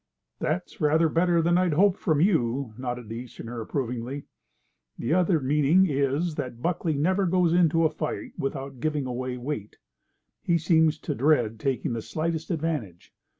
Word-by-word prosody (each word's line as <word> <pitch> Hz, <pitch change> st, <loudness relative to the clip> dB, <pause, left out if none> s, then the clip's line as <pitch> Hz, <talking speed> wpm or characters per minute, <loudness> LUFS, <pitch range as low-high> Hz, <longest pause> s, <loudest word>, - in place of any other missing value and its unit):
"That's 175 Hz, +3 st, -3 dB
rather 160 Hz, +2 st, +4 dB
better 170 Hz, +1 st, +2 dB
than 175 Hz, +2 st, +3 dB
I 185 Hz, -1 st, +2 dB
hoped 185 Hz, +5 st, +3 dB
from 155 Hz, -5 st, +1 dB
you," 135 Hz, -, +1 dB
nodded 125 Hz, -1 st, -5 dB
the 115 Hz, +2 st, -6 dB
Easterner, 120 Hz, -1 st, -7 dB
approvingly. 125 Hz, +3 st, -3 dB, 0.7 s
"The 120 Hz, -, -1 dB
other 175 Hz, -2 st, +3 dB
meaning 150 Hz, +6 st, +3 dB
is 140 Hz, +3 st, 0 dB
that 125 Hz, -5 st, -4 dB
Buckley 165 Hz, +1 st, -1 dB
never 185 Hz, +6 st, +1 dB
goes 175 Hz, -1 st, +2 dB
into 165 Hz, -2 st, +3 dB
a -, -, +4 dB
fight 155 Hz, 0 st, -4 dB
without 135 Hz, -1 st, -4 dB
giving 150 Hz, 0 st, -1 dB
away 125 Hz, 0 st, -3 dB
weight. 125 Hz, -5 st, -5 dB, 0.6 s
He 170 Hz, -, +2 dB
seems 160 Hz, -1 st, +3 dB
to 150 Hz, -, -2 dB
dread 125 Hz, -6 st, +2 dB
taking 130 Hz, -1 st, -1 dB
the 115 Hz, -, -3 dB
slightest 160 Hz, +5 st, -3 dB
advantage. 150 Hz, -, -3 dB
150 Hz, 155 wpm, -26 LUFS, 125-165 Hz, 0.7 s, rather